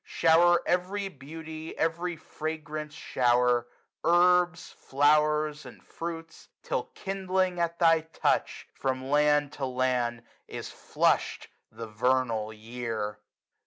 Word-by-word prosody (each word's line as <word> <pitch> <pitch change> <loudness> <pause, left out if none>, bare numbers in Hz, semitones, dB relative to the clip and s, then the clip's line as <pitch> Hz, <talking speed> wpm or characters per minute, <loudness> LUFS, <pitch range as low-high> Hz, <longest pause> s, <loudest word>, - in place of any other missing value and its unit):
Shower 170 +1 +4
every 190 +3 -1
beauty, 160 +1 -9
every 170 +2 -1
fragance 155 -1 -6
shower^^ 125 -3 +2 0.4
Herbs, 175 0 +3
flow'rs, 150 +2 +2
and - - -13
fruits; 165 -1 -7
till, - - -2
kindling 190 -2 -1
at 170 0 -1
thy 165 -1 +5
touch. 160 +1 -1
From 130 -1 -2
land 150 0 +3
to 140 - -3
land 125 -2 -1 0.2
is - - -7
flushed - - 0 0.2
the 115 - -7
vernal 115 -1 0
year. 110 -1 -5
150 Hz, 105 wpm, -28 LUFS, 130-170 Hz, 0.4 s, thy